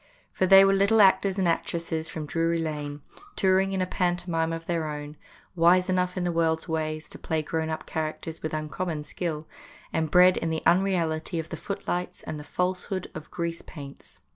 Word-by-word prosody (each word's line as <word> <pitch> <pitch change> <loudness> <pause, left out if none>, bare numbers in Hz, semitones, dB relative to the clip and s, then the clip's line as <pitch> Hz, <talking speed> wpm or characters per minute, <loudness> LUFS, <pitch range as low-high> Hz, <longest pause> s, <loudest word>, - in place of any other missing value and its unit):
For 185 - +1
they 195 +1 +9
were 195 - +4
little 200 +3 +4
actors 195 -1 +5
and 190 -2 +2
actresses 165 -1 -1
from 155 -2 -5
Drury 165 +2 0
Lane, 150 -3 -4 0.3
tour 190 -1 +4
ing 195 0 0
in 190 -1 0
a - - 0
pantomime 175 -3 0
of 165 0 -5
their 165 -2 -1
own; 150 0 -6 0.4
wise 180 +2 +4
enough 180 0 0
in 180 - 0
the 175 - 0
world's 165 0 +1
ways 155 -1 -2
to - - -10
play 160 -1 -1
grown 160 +1 -2
up 160 - -4
characters 160 +1 -4
with 155 - -3
uncommon 155 +1 -3
skill, 155 -1 -4 0.5
and 160 -1 0
bred 180 +2 +6
in 165 - -1
the 160 0 -2
unreality 170 -3 +2
of 165 0 -4
the - - -4
footlights 180 -2 -4
and 150 - -5
the - - -8
falsehood 180 +3 -2
of 155 -1 -8
grease 170 -1 -3
paints. 140 -2 -10
165 Hz, 190 wpm, -27 LUFS, 155-180 Hz, 0.5 s, they